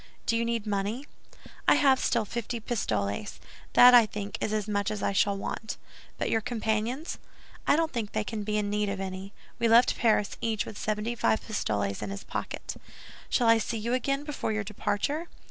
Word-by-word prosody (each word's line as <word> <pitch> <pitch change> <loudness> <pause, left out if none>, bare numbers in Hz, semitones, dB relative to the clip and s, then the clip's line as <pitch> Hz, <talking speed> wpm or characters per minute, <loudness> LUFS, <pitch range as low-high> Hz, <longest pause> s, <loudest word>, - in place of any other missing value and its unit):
"Do 230 - +1
you 230 - +1
need 230 -2 -1
money?" 210 +6 -2 0.6
"I - - +7
have 270 -2 +4
still 230 -2 +1
fifty 235 +2 -4
pistoles. 105 - -2 0.3
That, 250 0 +9
I 235 -3 +8
think, 205 -1 -5
is - - -1
as 215 -1 -1
much 205 -1 0
as 210 -2 -4
I - - +2
shall 200 0 +2
want." 215 +2 -4 0.4
"But - - -1
your 225 - +2
companions?" 225 +6 -2 0.5
"I - - +6
don't 320 -1 0
think 225 -4 -3
they 215 - 0
can 215 +1 -4
be 210 +1 -1
in 205 -1 -1
need 210 0 0
of 200 -1 -3
any. 190 0 -5 0.3
We 235 - +3
left 230 +2 +5
Paris, 215 -3 +2
each 220 -2 0
with - - -8
seventy 215 +2 -1
five 220 -1 +1
pistoles 100 - -1
in - - -4
his 200 0 -6
pocket." - - -5 0.6
"Shall 240 - +2
I 230 0 +6
see 225 +1 -2
you 230 +3 -2
again 275 +3 0
before 295 -6 -3
your 215 0 -1
departure?" 280 - -2
215 Hz, 195 wpm, -28 LUFS, 205-235 Hz, 0.6 s, That